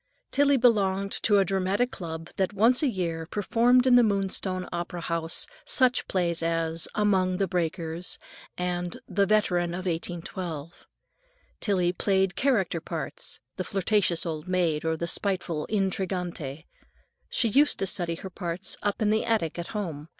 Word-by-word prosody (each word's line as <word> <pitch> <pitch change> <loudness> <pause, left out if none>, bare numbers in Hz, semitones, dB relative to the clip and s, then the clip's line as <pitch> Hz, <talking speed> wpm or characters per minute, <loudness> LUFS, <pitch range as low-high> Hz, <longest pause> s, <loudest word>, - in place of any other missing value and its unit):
Tillie 285 -1 +4
belonged 200 -5 +2
to 205 -2 +4
a 195 - +4
dramatic 195 +6 0
club 165 -1 -6
that 190 +1 0
once 230 +5 +4
a 300 - +3
year 170 -7 -2
performed 235 +6 +3
in 255 - +5
the 245 - +8
Moonstone 195 -3 0
Opera 175 0 -4
House 165 -1 -1 0.2
such 255 - +3
plays 170 -3 0
as 165 0 0
"Among 190 -3 +2
the 195 - +1
Breakers," 170 -1 -2 0.4
and 180 -1 -2
"The 195 +1 +1
Veteran 180 -5 +2
of 185 +1 -5
1812." 170 -2 -5 0.7
Tillie 180 -4 +1
played 190 0 +1
character 200 - +1
parts, 165 -2 -4 0.2
the 185 - -1
flirtatious 190 -3 +1
old 160 0 -4
maid 175 -4 +1
or 160 0 0
the 170 - -3
spiteful 180 -5 -1
intrigante. 180 -7 -2 0.6
She 230 - +1
used 290 +7 +4
to 195 - -1
study 175 -3 -1
her 190 +2 -8
parts 175 +1 -3
up 205 +1 -1
in 210 - +3
the 220 - +2
attic 195 -8 0
at 170 - -4
home. 165 -8 -4
185 Hz, 150 wpm, -27 LUFS, 170-205 Hz, 0.7 s, the